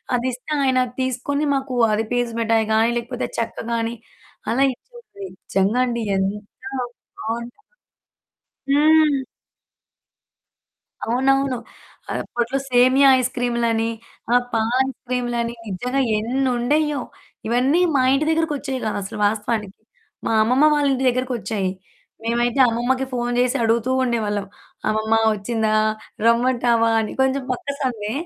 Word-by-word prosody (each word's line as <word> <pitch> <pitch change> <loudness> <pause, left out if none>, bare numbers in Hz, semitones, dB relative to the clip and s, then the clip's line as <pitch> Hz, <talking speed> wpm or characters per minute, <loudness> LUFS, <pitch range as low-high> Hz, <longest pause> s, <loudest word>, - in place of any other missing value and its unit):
అదిస్తే 250 +3 -3
ఆయనది 255 -2 +1
తీసుకొని 260 +3 -1
మాకు 265 -2 -3 0.2
అది 220 +1 +1
పీచు 245 -1 0
మిటాయి 225 -1 +2
గాని 225 +2 +3
లేకపోతే 245 +1 -3
చెక్క 230 - -3 0.2
గాని 230 0 -1 0.6
అలా 265 +4 +2
ఇచ్చుది. 470 - -13
నిజంగా 200 +6 0
అండి 235 -1 -2
ఎంత 195 +2 -1 0.8
బావుంటాదో. 235 - -5 1.1
హ్మ్. 305 -1 +5 1.9
అవునవును. 265 +2 +1 0.6
అప్పట్లో 240 +3 -2
సేమియా 255 +3 +6
ఐస్‌క్రీములని, 235 -2 0 0.4
ఆ! - - +5 0.2
పాలైస్‌క్రీములని 240 0 -1
నిజంగా 250 +8 -1 0.2
ఎన్నుండేయో, 265 +4 0 0.5
ఇవన్నీ 260 +9 +2
మా 260 - +4
ఇంటి 295 +3 +1
దగ్గరకొచ్చేయి 295 -5 -1
కాదు, 215 - -1
అసలు 195 - -7
వాస్తవానికి. 210 -1 -2 0.5
మా - - 0
అమ్మమ్మ 255 +6 +3
వాళ్ళ 290 -1 +2
ఇంటి 260 0 -1
దగ్గరకొచ్చాయి. 240 -6 -2 0.5
మేమైతే 240 +3 0
అమ్మమ్మకి 255 +3 0
ఫోన్ 240 0 -1
చేసి 250 +2 +2
అడుగుతూ 230 +3 +1
ఉండేవాళ్ళం. 210 -5 -1 0.4
అమ్మమ్మ 215 +1 0 0.2
వచ్చిందా? 215 +1 -1 0.5
రమ్మంటావా 235 -1 +3
అని, 215 - -4
కొంచెం 265 0 +1
పక్క 255 - -5
సందే, 220 -5 -2
245 Hz, 110 wpm, -21 LUFS, 230-265 Hz, 1.9 s, సేమియా